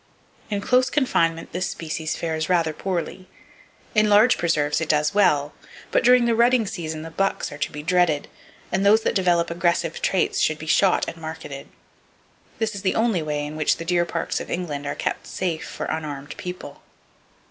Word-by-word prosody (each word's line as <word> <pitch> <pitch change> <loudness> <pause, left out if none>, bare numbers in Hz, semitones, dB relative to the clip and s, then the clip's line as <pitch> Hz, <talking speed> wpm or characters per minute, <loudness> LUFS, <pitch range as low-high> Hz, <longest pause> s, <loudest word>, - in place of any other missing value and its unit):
In 205 -2 -2
close 255 +4 +3
confinement 165 - +1
this 180 +1 -2
species 160 -1 -4
fares 160 -1 -2
rather 165 -3 +2
poorly. 185 +2 -4 0.7
In 215 -1 +3
large 210 +4 +6
preserves 155 -3 0
it 160 - -3
does 150 +3 +2
well, 150 -8 +3 0.4
but - - +2
during 250 0 +6
the 235 - +2
rutting 235 0 +4
season 160 -5 -5
the 165 - -8
bucks 195 +4 -1
are 145 - -9
to - - -2
be 150 0 -7
dreaded; 170 -3 +2 0.4
and 190 +2 +1
those 210 +2 +5
that - - +1
develop 175 -4 +2
aggressive 170 -1 0
traits 190 - +1
should 155 - +2
be 155 - -8
shot 185 +4 +3
and - - -6
marketed. 155 -3 -7 0.9
This 220 -1 -1
is 200 - -6
the 190 - 0
only 225 -6 +2
way 150 -1 -2
in 150 +1 -7
which 155 -1 +1
the 165 - -7
deer 175 0 +2
parks 165 -1 -2
of - - -7
England 150 -5 -3
are 145 - -2
kept - - -3
safe 170 -4 -3
for - - -5
unarmed 145 -3 -5
people. 180 -5 -8
170 Hz, 185 wpm, -23 LUFS, 155-195 Hz, 0.9 s, large